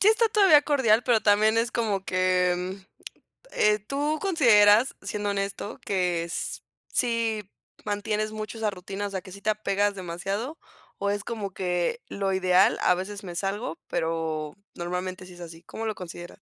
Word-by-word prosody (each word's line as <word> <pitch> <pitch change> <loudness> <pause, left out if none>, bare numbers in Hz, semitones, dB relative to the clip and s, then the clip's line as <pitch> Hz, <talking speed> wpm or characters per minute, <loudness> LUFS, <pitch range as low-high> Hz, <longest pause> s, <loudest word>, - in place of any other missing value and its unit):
sí, 395 - +3
está 445 +1 +4
todavía 390 -9 +6
cordial, 250 -7 +3
pero 240 -3 +3
también 215 +2 +4
es 230 +1 0
como 210 -5 -1
que, 185 -1 +2 1.0
mm, - - -19
eh, 210 0 +3
¿tú 285 +8 -2
consideras, 235 - +5
siendo 205 +1 -3
honesto, 200 0 -3
que 180 -3 0
s 170 - -4 0.3
si 225 -4 0 0.4
mantienes 210 +1 -1
mucho 215 +1 -6
esa 220 -1 0
rutina, 195 +2 -5
o - - -6
sea 190 -2 -4
que 185 - -12
sí 200 - -9
te 215 - -1
apegas 205 -1 0
demasiado, 195 - -4 0.4
o 200 - -1
es 205 0 -2
como 210 -4 -4
que 180 +6 -1
lo 195 -1 -2
ideal, 185 0 +4
a 180 - +4
veces 200 +3 -6
me 180 -2 -7
salgo, 195 0 -3
pero 160 -2 -2 0.2
normalmente 180 +1 -4
sí 180 - -12
es - - -15
así?, 165 -1 -9
¿cómo 225 - -6
lo 215 -1 -2
consideras? 175 -1 -9
205 Hz, 170 wpm, -26 LUFS, 185-220 Hz, 1.0 s, todavía